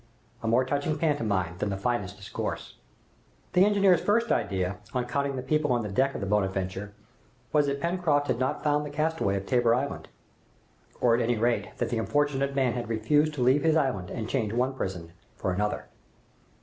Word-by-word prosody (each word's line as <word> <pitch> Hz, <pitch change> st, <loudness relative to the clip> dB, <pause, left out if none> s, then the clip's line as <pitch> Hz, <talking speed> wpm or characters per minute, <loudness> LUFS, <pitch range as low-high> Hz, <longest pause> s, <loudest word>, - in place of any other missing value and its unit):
A 115 Hz, -, -3 dB
more 120 Hz, +3 st, +3 dB
touching 145 Hz, +3 st, -1 dB
pantomime 100 Hz, -, 0 dB
than 105 Hz, -, -1 dB
the 100 Hz, -, -2 dB
finest 100 Hz, -2 st, -2 dB
discourse. 100 Hz, -, -5 dB, 0.8 s
The 180 Hz, -, +6 dB
engineer's 200 Hz, -4 st, +4 dB
first 230 Hz, +4 st, +2 dB
idea, 95 Hz, 0 st, 0 dB, 0.2 s
on 125 Hz, -1 st, 0 dB
counting 140 Hz, +2 st, -1 dB
the 130 Hz, -, -4 dB
people 150 Hz, 0 st, +1 dB
on 120 Hz, -2 st, +1 dB
the 105 Hz, -, -5 dB
deck 135 Hz, +6 st, +1 dB
of -, -, -4 dB
the -, -, -1 dB
"Bonadventure," 95 Hz, 0 st, -1 dB, 0.6 s
was 150 Hz, -1 st, +4 dB
that 140 Hz, 0 st, -1 dB
Pencroft 170 Hz, -4 st, +1 dB
had 120 Hz, -, -1 dB
not 130 Hz, -, -1 dB
found 150 Hz, -1 st, +2 dB
the 150 Hz, -, -5 dB
castaway 155 Hz, -8 st, 0 dB
of 100 Hz, 0 st, -3 dB
Tabor 120 Hz, 0 st, +3 dB
Island, 140 Hz, +3 st, -3 dB, 0.9 s
or 120 Hz, -2 st, +4 dB
at 120 Hz, -, +2 dB
any 120 Hz, 0 st, +1 dB
rate 105 Hz, -4 st, 0 dB
that -, -, -1 dB
the 115 Hz, -, -1 dB
unfortunate 140 Hz, +2 st, 0 dB
man 130 Hz, -3 st, +2 dB
had 120 Hz, -2 st, -4 dB
refused 145 Hz, +8 st, +2 dB
to 130 Hz, -, 0 dB
leave 130 Hz, +4 st, +4 dB
his 160 Hz, 0 st, +3 dB
island 125 Hz, -, 0 dB
and 110 Hz, -2 st, -4 dB
change 110 Hz, -4 st, -1 dB
one 125 Hz, +3 st, +1 dB
prison 90 Hz, -9 st, -5 dB, 0.2 s
for 95 Hz, -, -2 dB
another. 105 Hz, +3 st, -1 dB
125 Hz, 190 wpm, -27 LUFS, 105-145 Hz, 0.9 s, The